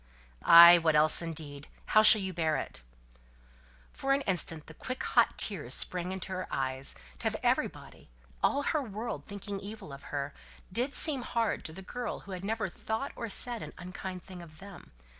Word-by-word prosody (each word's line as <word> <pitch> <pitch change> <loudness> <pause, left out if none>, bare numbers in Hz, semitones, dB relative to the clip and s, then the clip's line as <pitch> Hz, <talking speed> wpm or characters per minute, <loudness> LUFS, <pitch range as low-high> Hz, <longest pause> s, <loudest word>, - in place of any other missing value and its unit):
"Ay; 170 +1 +9
what 160 -2 +1
else, 155 +2 +8
indeed? 150 -4 -6 0.2
How 215 - +4
shall 215 -1 +7
you 190 -1 -4
bear 160 -2 0
it?" - - -7 1.1
For 275 0 -1
an 275 - 0
instant 170 - -1
the - - -13
quick 255 0 -6
hot 235 -2 +2
tears 150 - -1
sprang 180 0 -1
into 190 0 -5
her 185 0 -4
eyes; 130 0 +1 0.2
to - - -4
have - - -2
everybody - - -2 0.3
all 285 - +1
her 305 +1 0
world, 225 -1 -6
thinking 200 -1 -6
evil 200 -7 -9
of 140 - -12
her, 140 0 -4 0.4
did 250 +8 -1
seem 290 -5 0
hard 230 -2 -2
to - - -2
the 190 +4 -11
girl 245 +4 -6
who 200 - -12
had 185 0 -7
never 215 0 -2
thought 220 +8 -5
or 230 -2 -6
said 240 +3 +1
an - - -9
unkind 185 0 -8
thing 185 -2 -11
of 155 -2 -14
them. 195 +1 -13
190 Hz, 185 wpm, -29 LUFS, 165-220 Hz, 1.1 s, Ay